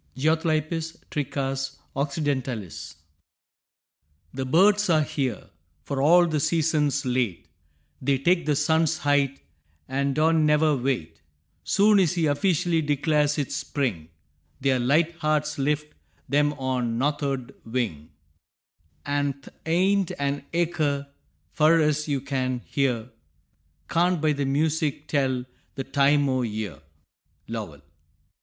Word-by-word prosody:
(Geothlypis 160 +2 0
trichas 135 -1 -3 0.2
occidentalis.) 135 - -3 1.4
The 130 0 -3
birds 200 +7 +4
are 155 -2 +4
here, 130 -7 -3 0.3
for 135 +6 -3
all 175 +5 +6
the 155 -3 0
season's 150 -2 +1
late. 125 -10 -1 0.5
They 135 +1 +2
take 170 +5 +1
the 150 - +2
sun's 160 +2 +2
height, 140 -1 +1 0.5
an' 140 0 -1
don' 160 +1 +3
never 150 0 +3
wait; 120 - -2 0.4
Soon's 200 -4 +4
he 170 -3 +1
officially 165 +2 +1
declares 150 0 +1
it's 145 -3 -2
spring, 105 - -2 0.5
Their 130 -1 +2
light 155 +7 +2
hearts 150 -2 0
lift 150 +2 -1 0.4
'em 145 0 +3
on 130 -3 -2
a - - 0
north'ard 140 -2 -1
wing, 110 - -3 1.0
An' 145 0 0
th' 140 0 -16 0.2
aint 190 +3 +2
an 140 0 -2
acre, 155 -5 0 0.4
fur 160 +2 +4
ez 150 -1 +1
you 140 -3 -1
can 130 -2 -2
hear, 125 -4 -1 0.8
Can't 175 +1 +2
by 155 0 +2
the 140 -1 -2
music 150 +1 0
tell 130 -4 0 0.3
the 135 - -3
time 140 +1 +3
o' 130 -1 +1
year. 105 - -4 0.7
_Lowell. 100 -11 -6
145 Hz, 120 wpm, -25 LUFS, 130-155 Hz, 1.4 s, all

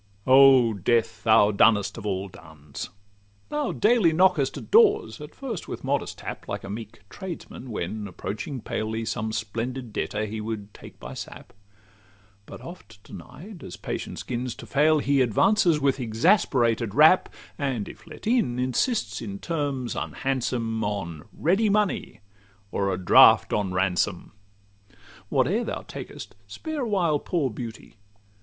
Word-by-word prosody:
O 130 -3 +7
Death! 110 +2 0
thou 110 -2 +5
dunnest 105 0 +3
of 110 -2 -6
all 95 0 -2
duns! 80 -6 -10 0.6
thou 295 -2 -1
daily 215 -5 +3
Knockest 165 -5 +2
at - - -10
doors, 410 - +4
at 150 +1 -10
first 245 -9 -6
with - - -7
modest - - -2
tap, - - -7
Like - - -4
a 100 - -6
meek 110 0 -8
tradesman 170 - -8
when, 105 0 -4
approaching 105 - -6
palely, 110 +1 -3
Some 110 0 -2
splendid 115 +2 -4
debtor 105 +1 -2
he 110 +1 -5
would 105 -2 -6
take - - -13
by - - -8
sap: - - -9 0.9
But - - -10
oft 115 - -12
denied, 145 - -11
as 90 - -8
patience - - -5
'gins 125 -1 -4
to - - -10
fail, 155 +2 +3
he 140 -1 +2
Advances 160 - +3
with 140 -1 +1
exasperated 120 - +2
rap, 155 +5 +6 0.3
And 130 -8 -2
(if - - -12
let 155 - -11
in) 225 - +1
insists, 125 - -1
in 100 -4 -6
terms 140 -4 -3
unhandsome, 120 -4 -2
On 85 -7 -4
ready 195 +7 +1
money, 205 - 0 0.5
or 100 -1 0
'a 90 - -1
draft 90 -1 +6
on 100 -3 0
Ransom.' 90 0 0 1.0
Whate'er - - +1
thou - - -4
takest, - - -9
spare 310 - -5
a 240 - -2
while 170 -7 +1
poor 145 -7 -1
Beauty! 110 -1 -8
120 Hz, 145 wpm, -25 LUFS, 105-155 Hz, 1.0 s, O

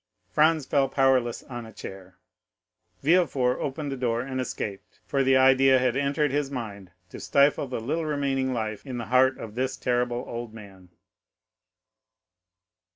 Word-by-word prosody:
Franz 155 -1 +3
fell 135 -2 +1
powerless 130 -3 +2
on 120 -2 -7
a 110 - -11
chair; 95 -3 -10 0.9
Villefort 140 -6 +2
opened 145 +1 -4
the - - -2
door 120 -2 -1
and 130 0 -3
escaped, 100 -5 -6
for 140 - 0
the 130 0 +4
idea 130 0 +5
had 125 -1 +1
entered 140 +1 0
his 145 0 -1
mind 105 -8 -6 0.2
to - - -8
stifle 140 0 +2
the 125 - -4
little 155 +8 -2
remaining 135 -3 0
life 110 -3 -3
in 130 -3 -6
the 115 - -4
heart 130 +1 +4
of 110 -2 -8
this 130 +2 -2
terrible 125 -1 -1
old 120 -1 -6
man. 95 -4 -13
130 Hz, 155 wpm, -26 LUFS, 120-140 Hz, 0.9 s, idea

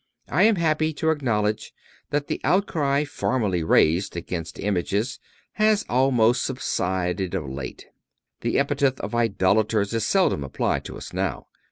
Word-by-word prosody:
I 165 - +2
am 225 -1 +5
happy 155 -2 +1
to 160 +2 +1
acknowledge 110 -7 -1 0.3
that 145 0 -1
the - - -4
outcry 150 -7 +1
formerly 110 - -1
raised 85 +3 +3
against 85 -1 -5
images 105 +4 -1 0.3
has 215 -1 +2
almost 125 -2 +3
subsided 95 -6 -2
of 80 -7 -3
late. 65 0 -7 0.5
The - - 0
epithet 140 -1 +1
of - - -5
idolaters 110 -1 +1
is 115 - 0
seldom 185 - +2
applied 65 - -1
to - - -7
us - - -9
now. - - -2
115 Hz, 140 wpm, -24 LUFS, 95-145 Hz, 0.5 s, am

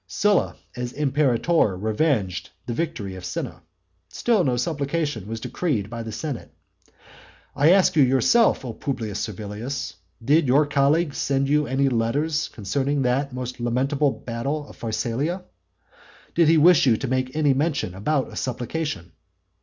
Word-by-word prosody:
Sylla 205 -2 +1 0.2
as 125 0 -4
imperator 140 - +2
revenged 110 - 0 0.2
the 120 - -3
victory 120 - -3
of 95 -1 -9
Cinna, 90 - -5 0.5
still 225 -6 +1
no 125 -5 +1
supplication 145 - -2
was 115 +1 -4
decreed 115 - -2
by 115 -1 -4
the 115 -1 -6
senate. 135 +2 -5 1.0
I 145 +2 +4
ask 190 -1 +5
you 150 - +5
yourself, 135 - +4
O 120 - -4
Publius 110 -5 -4
Servilius, 110 +5 -5 0.3
did 150 +3 +4
your 140 +4 +4
colleague 145 +2 +2
send 135 0 0
you 150 +1 +2
any 135 +1 +1
letters 140 +6 0
concerning 135 +7 -1
that 135 +3 0
most 125 0 -5
lamentable 135 +5 +1
battle 135 +5 -4
of - - -13
Pharsalia? 120 - -2 0.9
Did 170 -2 +4
he 165 +1 +5
wish 160 -2 +6
you 115 -3 +4
to 135 - -4
make 130 +1 -1
any 150 -3 +3
motion 145 - -1
about 130 +9 -1
a - - -9
supplication? 125 - -3
135 Hz, 145 wpm, -24 LUFS, 115-150 Hz, 1.0 s, wish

